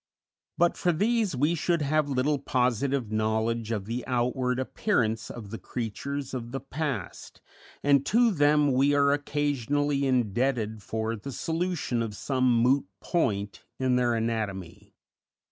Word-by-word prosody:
But 175 0 +3
for 175 - +2
these 210 - +1
we 145 +6 +2
should 170 -1 0
have 150 +1 +1
little 140 +2 +1
positive 130 -2 0
knowledge 110 +1 0
of 105 -4 -2
the 115 +3 -3
outward 125 +1 0
appearance 115 - 0
of 105 -4 -8
the 115 - -5
creatures 135 +4 -4
of 120 -2 -5
the 135 - -3
past, 135 - -5 0.4
and 140 -1 +4
to 235 +2 +4
them 145 -3 +3
we 140 +3 +3
are 140 0 +4
occasionally 145 -1 0
indebted 120 -2 0
for 110 +2 -2
the 115 +6 -7
solution 165 -4 -2
of 110 -3 -3
some 130 +2 +1
moot 120 0 +3
point 100 - -1
in 130 -1 +1
their 120 -1 +2
anatomy. 105 -4 -4
130 Hz, 140 wpm, -27 LUFS, 115-145 Hz, 0.4 s, and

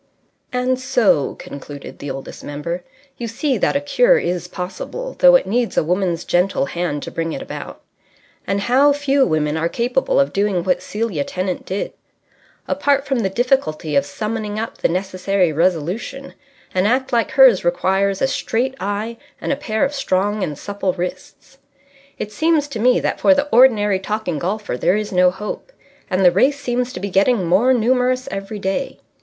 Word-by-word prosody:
And 250 +1 0
so 245 - +2
(concluded 140 0 -10
the 145 - -6
Oldest 135 0 -7
Member) 170 +5 -4 0.4
you 235 - -3
see 260 +5 -1
that - - +1
a - - +3
cure - - +3
is 180 0 -2
possible, 190 - -6
though - - +8
it - - +4
needs 240 0 -1
a - - +4
woman's 175 0 0
gentle 180 -3 +1
hand 160 -2 -3
to - - -6
bring 165 0 -3
it - - -5
about. - - -8 0.7
And 200 0 0
how 270 +6 +4
few 280 -1 +2
women 155 -2 0
are 165 +1 0
capable 245 +5 0
of 140 +1 +2
doing 200 -3 +1
what 180 -1 +1
Celia 210 -9 -2
Tennant 185 +4 -4
did. 190 +2 -3 0.7
Apart 280 -1 +1
from 270 -3 0
the 195 -4 0
difficulty 190 - 0
of 140 - +4
summoning 215 +5 -4
up 225 +1 -5
the - - +2
necessary 185 -1 0
resolution, 185 - -1 0.4
an 185 +2 +2
act 255 +3 0
like 235 -1 +2
hers 260 -7 +6
requires 190 +3 +1
a - - +4
straight 260 0 -1
eye 210 +4 -3 0.2
and - - -1
a - - 0
pair 245 -4 0
of 275 - -3
strong 205 -5 0
and 150 -5 -3
supple 200 0 -2
wrists. 180 0 -7 0.6
It 210 - -5
seems 310 +5 +1
to 240 -6 -5
me 250 +3 +4
that - - -1
for 290 - +5
the 285 +1 0
ordinary 215 -6 +5
talking 195 -5 -3
golfer 200 - -3
there 185 +9 +2
is 215 -1 -3
no 180 -1 +4
hope. 210 - -6 0.4
And 185 +1 +1
the 175 - +8
race 270 +10 +2
seems 250 -2 -1
to - - -5
be 200 0 -4
getting 200 +1 +3
more 190 +10 +3
numerous 255 +2 +2
every 195 +2 -5
day. 195 +7 -2
205 Hz, 180 wpm, -20 LUFS, 180-255 Hz, 0.7 s, though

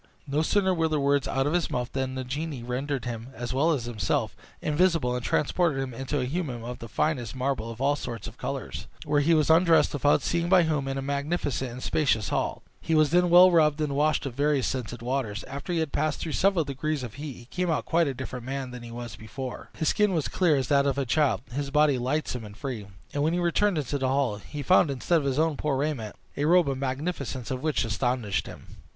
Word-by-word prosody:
No 145 +1 0
sooner 190 +3 +2
were 165 -2 +1
the 155 -1 0
words 140 0 +2
out 135 0 0
of 145 - 0
his 175 -2 +1
mouth 125 0 -2
than 130 -1 -2
the 130 - -3
genie 140 0 -4
rendered 130 +2 -3
him, 115 -1 -5
as 120 0 -4
well 150 +6 +3
as 135 -7 -1
himself, 110 -6 -1 0.2
invisible, 155 -5 +2
and 125 - -3
transported 155 +2 +1
him 135 -2 -3
into 135 +4 -2
a 125 - 0
hummum 130 -5 -3
of 125 +1 -6
the 115 - -7
finest 125 -1 -1
marble 130 -3 -1
of 115 0 -8
all 140 +2 +2
sorts 120 -5 -6
of 115 - -8
colors, 135 +1 -5 0.2
where 145 -1 +2
he 165 +3 +4
was 155 0 +3
undressed, 165 0 +5
without 145 0 +3
seeing 170 0 0
by 185 -2 +6
whom, 150 -4 0
in 135 0 -2
a 135 - -3
magnificent 140 -1 -1
and 125 +2 -8
spacious 120 -9 +1
hall. - - -1 0.2
He 160 - 0
was 155 -1 +4
then 180 +1 +4
well 180 +2 +8
rubbed 155 -3 +4
and 150 -2 -1
washed 150 +1 +2
with 135 - -4
various 145 0 +1
scented 120 -2 -4
waters. 120 -5 -2
After 140 +6 -6
he 175 - 0
had 160 -3 -1
passed 155 +1 0
through 160 - -4
several 185 -1 +2
degrees 140 +1 -2
of 120 -4 -6
heat, 145 -2 -6
he 120 - -13
came 180 +7 -2
out 155 - 0
quite 170 -1 +2
a 135 - -2
different 125 -1 -6
man 135 +1 -4
from 125 - -7
what - - -11
he 120 - -9
was 120 0 -7
before. 125 +3 -7
His 160 - +1
skin 210 -2 +2
was 155 - 0
clear 175 -5 +2
as 135 -3 0
that 140 -1 +4
of 140 -1 0
a 140 - 0
child, 130 -5 +2
his 140 +2 -3
body 150 -2 +3
lightsome 130 -1 -2
and 105 -1 -10
free; 120 -7 -5 0.3
and 145 - -1
when 155 +3 +2
he 175 - +1
returned 175 +2 +2
into 145 -1 -2
the 130 - 0
hall, 130 -5 +1
he 145 +8 -7
found, 180 +1 +5
instead 140 +5 +1
of 145 - -4
his 135 -1 0
own 160 -2 +2
poor 145 -3 0
raiment, 135 -7 -2 0.2
a 145 - +1
robe 175 +2 +5
the 135 -1 -1
magnificence 135 -1 -3
of 130 -1 -3
which 155 -6 0
astonished 115 - -1
him. - - -10
140 Hz, 240 wpm, -27 LUFS, 125-155 Hz, 0.3 s, well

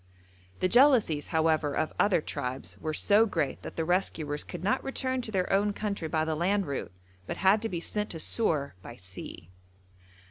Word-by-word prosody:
The 185 - +3
jealousies, 235 - +4
however, 160 -3 +1
of 155 - -1
other 200 -5 +3
tribes 130 -2 -4
were 155 - -3
so 205 +8 +4
great 145 -9 -2
that - - -8
the 165 - -1
rescuers 160 -4 0
could 175 -1 -8
not 200 - +1
return 260 -1 -1
to 230 - -6
their 190 -2 0
own 205 +1 +2
country 200 -6 -3
by 155 0 0
the 160 - -1
land 190 +5 +1
route, 140 - -4 0.4
but - - -4
had 195 +3 +4
to 225 - -2
be 175 - -3
sent 210 +4 -3
to 165 - -6
Sur 155 -7 0
by 120 - -10
sea. 90 -3 -9
175 Hz, 185 wpm, -29 LUFS, 155-210 Hz, 0.4 s, jealousies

